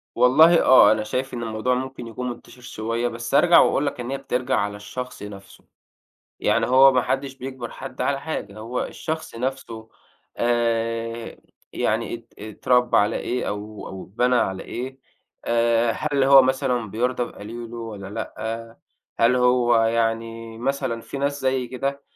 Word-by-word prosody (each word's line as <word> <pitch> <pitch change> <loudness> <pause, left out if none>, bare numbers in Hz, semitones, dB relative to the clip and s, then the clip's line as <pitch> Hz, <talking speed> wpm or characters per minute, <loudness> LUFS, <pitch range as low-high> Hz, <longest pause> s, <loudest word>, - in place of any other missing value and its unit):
والله، 155 +8 +6
آه، 125 -5 +7
أنا 110 0 +1
شايف 130 +5 -3
إن 120 -1 -4
الموضوع 115 +3 -1
ممكن 130 -1 -5
يكون 125 +2 -5
منتشر 120 +1 -10
شوية، 115 0 -3
بس 120 +2 -4
هارجع 175 +3 +7
وأقول 145 - +3
لك 140 - -3
إن 120 +1 -4
هي 135 - -1
بترجع 130 -1 -1
على 100 -1 -1
الشخص 125 +3 -7
نفسه. 100 -2 -11 0.8
يعني - - +2
هو 135 +2 +7
ما 125 -1 +2
حدش 135 +1 -2
بيجبر 130 -2 -7
حد 135 -1 -9
على 140 -1 0
حاجة، 110 -10 -5
هو 115 +3 -3
الشخص 160 -4 -5
نفسه، 115 -3 -5 0.5
آآ، 115 -1 -1 0.4
يعني 115 +2 -1
اتر 115 0 -10 0.2
اتربّى 125 +3 +2
على 105 - +3
إيه، 125 +1 -2
أو 105 +1 -6
أو 95 -1 -8
اتبنى 125 +6 +1
على 95 -5 0
إيه، 130 +2 -6 0.5
آآ، 115 0 +2
هل 145 +3 -1
هو 135 0 +8
مثلًا 130 -4 0
بيرضى 125 +3 0
بقليله 115 +1 -8
والّا 110 -4 -7
لأ، 115 +1 -6 0.4
هل 120 +2 +4
هو، 125 -1 +3
يعني 115 0 -1
مثلًا، 130 -2 -2
في 140 - -7
ناس 140 +1 -1
زيي 130 -1 0
كده، 140 +3 -3
120 Hz, 155 wpm, -23 LUFS, 115-130 Hz, 0.8 s, هو